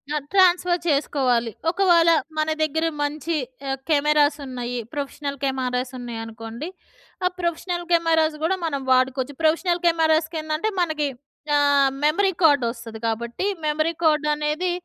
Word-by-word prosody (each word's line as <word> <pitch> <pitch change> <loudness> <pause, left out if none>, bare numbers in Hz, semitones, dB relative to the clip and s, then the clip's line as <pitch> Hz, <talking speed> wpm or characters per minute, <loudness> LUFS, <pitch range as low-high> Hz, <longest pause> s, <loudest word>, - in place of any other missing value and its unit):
ఆహ్, 295 -2 -3
ట్రాన్స్ఫర్ 360 -2 +4
చేసుకోవాలి. 260 -5 +1 0.2
ఒకవేళ 345 -2 +4 0.3
మన 310 0 +1
దగ్గర 320 +1 0 0.2
మంచి 300 +3 -2 0.3
ఆహ్, 270 - -1
కెమెరాస్ 300 0 +3
ఉన్నాయి. 245 -1 -4 0.2
ప్రొఫెషనల్ 285 0 -4
కెమెరాస్ 255 -1 -1
ఉన్నాయనుకోండి. 225 +2 -7 0.6
ఆ - - +5
ప్రొఫెషనల్ 345 +1 -2
కెమెరాస్ 325 -2 +3
గూడా 370 +4 +2
మనం 280 -4 -2
వాడుకోవచ్చు. 260 +1 +2
ప్రొఫెషనల్ 340 +3 +2
కెమెరాస్‌కి 320 -1 +2
ఏందంటే 310 +6 -1
మనకి 315 -3 0 0.5
ఆహ్, 285 -1 +4 0.2
మెమరీ 380 +6 +3
కార్డ్ 285 -4 +5
వస్తది. 230 -1 -8
కాబట్టి 235 - -3 0.2
మెమరీ 310 +2 0
కార్డ్ 305 -2 +3
అనేది 300 +4 -1
300 Hz, 125 wpm, -23 LUFS, 265-330 Hz, 0.6 s, ఆ